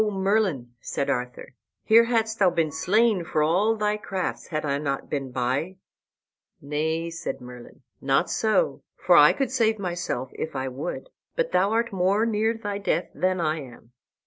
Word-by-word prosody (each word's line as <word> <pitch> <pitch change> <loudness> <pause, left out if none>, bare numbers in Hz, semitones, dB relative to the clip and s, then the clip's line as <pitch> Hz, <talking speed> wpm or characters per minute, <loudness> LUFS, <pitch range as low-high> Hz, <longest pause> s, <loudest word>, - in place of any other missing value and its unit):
"O 215 - 0
Merlin," 190 - 0
said 140 - -2
Arthur, 125 +1 -4 0.3
"here 230 +1 +6
hadst 225 -2 0
thou 190 -3 +5
been 165 -3 0
slain, 205 +4 +2
for 155 -2 0
all 195 +8 +2
thy 210 -1 0
crafts, 190 -3 -4
had 155 -2 -3
I 140 -1 0
not 140 -2 -3
been 135 -3 -2
by." 130 +8 -2 0.8
"Nay," 160 +3 -2
said 165 - -5
Merlin, 125 +2 -12 0.2
"not 135 +6 +2
so, 225 - +1 0.2
for - - +4
I - - +8
could 270 -3 -2
save 225 -4 +2
myself 175 -9 -3
if 160 - -5
I 130 0 -2
would; 150 - -6 0.2
but - - 0
thou 195 +2 +3
art 230 0 0
more 195 +4 +2
near 225 0 +1
thy 205 -2 -4
death 190 -3 -1
than 185 0 0
I 155 -1 0
am." 120 -3 -13
180 Hz, 170 wpm, -25 LUFS, 145-215 Hz, 0.8 s, I